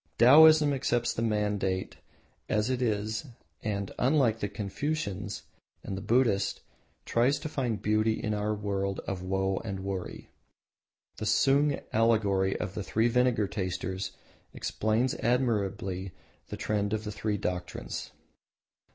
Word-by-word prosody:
Taoism 150 Hz, +4 st, +7 dB
accepts 120 Hz, -3 st, 0 dB
the -, -, -3 dB
mundane 105 Hz, -4 st, 0 dB, 0.6 s
as 105 Hz, +4 st, +1 dB
it 130 Hz, -1 st, -1 dB
is 110 Hz, +2 st, -1 dB, 0.3 s
and, 100 Hz, -2 st, -3 dB
unlike 125 Hz, -4 st, +3 dB
the 105 Hz, -, -2 dB
Confucians 105 Hz, -1 st, -3 dB, 0.4 s
or -, -, -4 dB
the 95 Hz, -, -4 dB
Buddhists, 115 Hz, -3 st, +1 dB, 0.4 s
tries 125 Hz, +5 st, +2 dB
to 155 Hz, -, -5 dB
find 125 Hz, -8 st, -2 dB
beauty 110 Hz, +1 st, +2 dB
in 105 Hz, -1 st, -2 dB
our 105 Hz, +1 st, -1 dB
world 100 Hz, -1 st, -2 dB
of 95 Hz, -2 st, -4 dB
woe 95 Hz, +1 st, 0 dB
and 100 Hz, -3 st, -4 dB
worry. 95 Hz, -1 st, -5 dB, 0.9 s
The 110 Hz, -, -3 dB
Sung 140 Hz, +6 st, +3 dB
allegory 105 Hz, -4 st, +2 dB
of 90 Hz, -, -3 dB
the 105 Hz, -, -4 dB
Three 110 Hz, +4 st, +1 dB
Vinegar 125 Hz, -3 st, +2 dB
Tasters 95 Hz, -1 st, -3 dB, 0.4 s
explains 110 Hz, +4 st, 0 dB
admirably 100 Hz, -6 st, -1 dB, 0.3 s
the -, -, -6 dB
trend 105 Hz, -1 st, -1 dB
of 110 Hz, 0 st, -1 dB
the 105 Hz, -, -4 dB
three 105 Hz, 0 st, -2 dB
doctrines. 90 Hz, -2 st, -4 dB
105 Hz, 130 wpm, -29 LUFS, 100-120 Hz, 0.9 s, Taoism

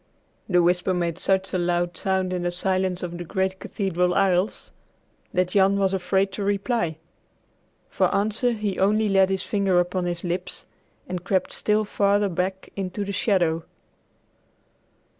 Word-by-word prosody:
The 180 Hz, -2 st, +4 dB
whisper 180 Hz, +1 st, +2 dB
made 170 Hz, -1 st, -2 dB
such 190 Hz, 0 st, 0 dB
a 185 Hz, -, +1 dB
loud 175 Hz, 0 st, 0 dB
sound 190 Hz, 0 st, -1 dB
in 180 Hz, -, -2 dB
the 175 Hz, -, 0 dB
silence 185 Hz, 0 st, -1 dB
of 175 Hz, 0 st, -5 dB
the -, -, -4 dB
great 190 Hz, +2 st, -2 dB
cathedral 180 Hz, -3 st, -1 dB
aisles 195 Hz, 0 st, +1 dB, 0.6 s
that 180 Hz, -1 st, +1 dB
Jan 195 Hz, +1 st, +3 dB
was 195 Hz, -1 st, +1 dB
afraid 190 Hz, +1 st, +1 dB
to 200 Hz, +2 st, -4 dB
reply. 200 Hz, -4 st, 0 dB, 0.9 s
For -, -, +1 dB
answer 220 Hz, +4 st, +1 dB
he 210 Hz, -3 st, -3 dB
only 215 Hz, +3 st, +3 dB
laid 195 Hz, -1 st, +4 dB
his 190 Hz, 0 st, -1 dB
finger 195 Hz, -3 st, +2 dB
upon 175 Hz, +1 st, -1 dB
his 175 Hz, -1 st, -3 dB
lips 180 Hz, +1 st, -4 dB, 0.4 s
and 180 Hz, -1 st, -4 dB
crept 190 Hz, -1 st, 0 dB
still 215 Hz, 0 st, +1 dB
farther 205 Hz, 0 st, +2 dB
back 185 Hz, +2 st, -3 dB
into 195 Hz, +1 st, -3 dB
the 200 Hz, -, -4 dB
shadow. 175 Hz, -5 st, +1 dB
190 Hz, 155 wpm, -24 LUFS, 180-200 Hz, 0.9 s, The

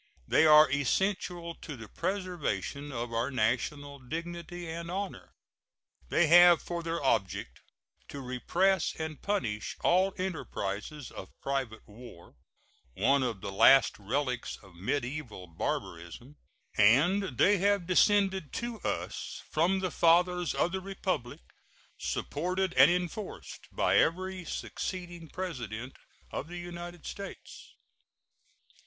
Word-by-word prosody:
They 160 Hz, -, +5 dB
are 155 Hz, 0 st, +8 dB
essential 170 Hz, +4 st, 0 dB
to 150 Hz, -4 st, -9 dB
the 115 Hz, -1 st, -9 dB
preservation 175 Hz, -, -3 dB
of 120 Hz, -2 st, -4 dB
our 115 Hz, +3 st, 0 dB
national 140 Hz, +4 st, -1 dB
dignity 170 Hz, +5 st, -6 dB
and 170 Hz, +1 st, -5 dB
honor; 195 Hz, +2 st, -5 dB, 0.7 s
they 175 Hz, -, +4 dB
have 175 Hz, +1 st, +8 dB
for 170 Hz, -1 st, -4 dB
their 165 Hz, 0 st, -2 dB
object 110 Hz, -9 st, 0 dB, 0.5 s
to 140 Hz, -, -7 dB
repress 140 Hz, +9 st, +1 dB
and 160 Hz, -1 st, -5 dB
punish 110 Hz, -, -2 dB
all 185 Hz, +2 st, +3 dB
enterprises 150 Hz, -, -4 dB
of -, -, -11 dB
private 135 Hz, -5 st, -3 dB
war, 105 Hz, -5 st, -13 dB, 0.6 s
one 140 Hz, 0 st, +3 dB
of 115 Hz, -7 st, -2 dB
the -, -, -5 dB
last 135 Hz, +7 st, +6 dB
relics 125 Hz, +4 st, -2 dB
of 95 Hz, -3 st, -16 dB
mediaeval 120 Hz, -, -3 dB
barbarism; 85 Hz, -, -5 dB, 0.4 s
and 140 Hz, -, +4 dB
they 205 Hz, 0 st, +5 dB
have 200 Hz, -1 st, +2 dB
descended 190 Hz, -3 st, +3 dB
to 235 Hz, -1 st, -4 dB
us -, -, -4 dB
from 180 Hz, +5 st, +2 dB
the 185 Hz, -2 st, -1 dB
fathers 175 Hz, +1 st, +3 dB
of 175 Hz, -, +1 dB
the 190 Hz, +1 st, -3 dB
Republic, 185 Hz, -, -3 dB, 0.6 s
supported 180 Hz, +4 st, -2 dB
and -, -, +7 dB
enforced 180 Hz, +4 st, -4 dB
by -, -, +2 dB
every 185 Hz, +1 st, 0 dB
succeeding 175 Hz, -3 st, -5 dB
President 130 Hz, -, -5 dB, 0.4 s
of 145 Hz, -, -4 dB
the 175 Hz, +1 st, -7 dB
United 175 Hz, 0 st, -8 dB
States. 200 Hz, 0 st, -9 dB
165 Hz, 120 wpm, -30 LUFS, 125-180 Hz, 0.7 s, are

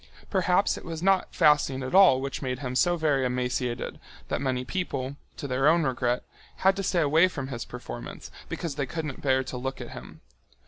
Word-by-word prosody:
Perhaps 185 Hz, 0 st, +2 dB
it -, -, -15 dB
was 165 Hz, -1 st, -6 dB
not 195 Hz, -1 st, +2 dB
fasting 145 Hz, -3 st, +3 dB
at 130 Hz, -, -5 dB
all 185 Hz, -9 st, +7 dB
which 135 Hz, 0 st, -4 dB
made 130 Hz, -2 st, -2 dB
him 130 Hz, -2 st, -4 dB
so 175 Hz, +6 st, +3 dB
very 150 Hz, -4 st, +2 dB
emaciated 125 Hz, -1 st, -2 dB, 0.3 s
that -, -, -1 dB
many 130 Hz, -2 st, -1 dB
people, 140 Hz, -6 st, -3 dB, 0.2 s
to 140 Hz, -, -5 dB
their 135 Hz, +2 st, +2 dB
own 165 Hz, +2 st, +5 dB
regret, 125 Hz, -2 st, 0 dB, 0.3 s
had 190 Hz, +1 st, +3 dB
to -, -, -1 dB
stay 180 Hz, -2 st, +1 dB
away 160 Hz, +4 st, +5 dB
from 135 Hz, -7 st, -5 dB
his 120 Hz, -3 st, -5 dB
performance, -, -, -8 dB, 0.2 s
because 160 Hz, -5 st, -4 dB
they 140 Hz, -2 st, -1 dB
couldn't 155 Hz, -2 st, -5 dB
bear 130 Hz, -1 st, +2 dB
to 130 Hz, -1 st, -6 dB
look 130 Hz, +2 st, -4 dB
at -, -, -7 dB
him. 65 Hz, +1 st, -10 dB
135 Hz, 195 wpm, -27 LUFS, 125-165 Hz, 0.3 s, all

